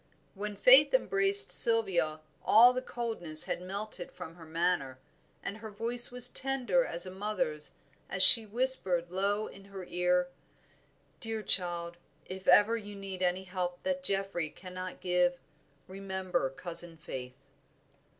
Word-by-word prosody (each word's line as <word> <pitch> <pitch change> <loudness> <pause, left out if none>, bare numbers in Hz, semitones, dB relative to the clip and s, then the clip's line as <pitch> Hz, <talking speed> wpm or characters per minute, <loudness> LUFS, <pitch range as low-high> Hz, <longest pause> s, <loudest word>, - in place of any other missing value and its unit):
When 205 +1 -6
Faith 260 - +5
embraced 400 -3 +2
Sylvia, 175 -9 0 0.2
all 240 +4 +6
the 255 - -3
coldness 220 -12 -1
had - - -4
melted 195 0 -7
from 180 -3 -10
her 165 -2 -15
manner, 160 -5 -2 0.5
and 200 - -6
her 220 0 -10
voice 230 +3 +3
was 250 0 +2
tender 265 0 0
as 170 -4 -1
a 185 - -7
mother's 190 -6 -4 0.4
as 190 -1 +1
she 230 - +11
whispered 200 -7 -1
low 200 +3 -1
in 195 -2 -13
her 195 -2 -10
ear 180 0 -1 0.9
"Dear 225 -2 -5
child, 175 -3 +1 0.3
if 190 0 -10
ever 215 +3 +5
you 205 -2 -8
need 195 -2 -8
any 180 +1 -1
help 180 -1 -5
that 275 0 -3
Geoffrey 195 - -2
cannot 185 +2 -10
give, 180 -1 0 0.5
remember 190 -5 -4
cousin 170 +3 -1
Faith." 130 -4 -9
190 Hz, 140 wpm, -29 LUFS, 175-225 Hz, 0.9 s, she